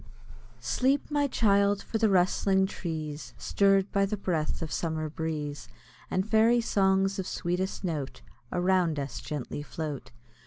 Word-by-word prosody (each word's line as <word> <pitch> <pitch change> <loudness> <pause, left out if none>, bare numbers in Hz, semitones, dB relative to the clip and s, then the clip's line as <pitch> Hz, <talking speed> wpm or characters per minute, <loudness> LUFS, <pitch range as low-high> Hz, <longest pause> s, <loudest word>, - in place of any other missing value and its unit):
] - - -24 0.2
Sleep, 270 +3 +1
my 290 -1 +2
child! 200 -4 +2
for 225 - -3
the 220 -1 +4
rustling 190 +1 +3
trees, 160 -5 -5
Stirr'd 195 -1 +2
by 195 0 +2
the 210 - -2
breath 165 -5 -1
of 160 - -5
summer 160 -2 -2
breeze, 150 -2 -4 0.4
And 190 +2 0
fairy 225 +2 +4
songs 195 -3 +2
of 185 - -3
sweetest 180 +3 -2
note, 155 -7 -4 0.3
Around 180 -3 +2
us 140 -2 -4
gently 145 -1 -5
float. 150 -2 -5
190 Hz, 145 wpm, -28 LUFS, 160-200 Hz, 0.4 s, the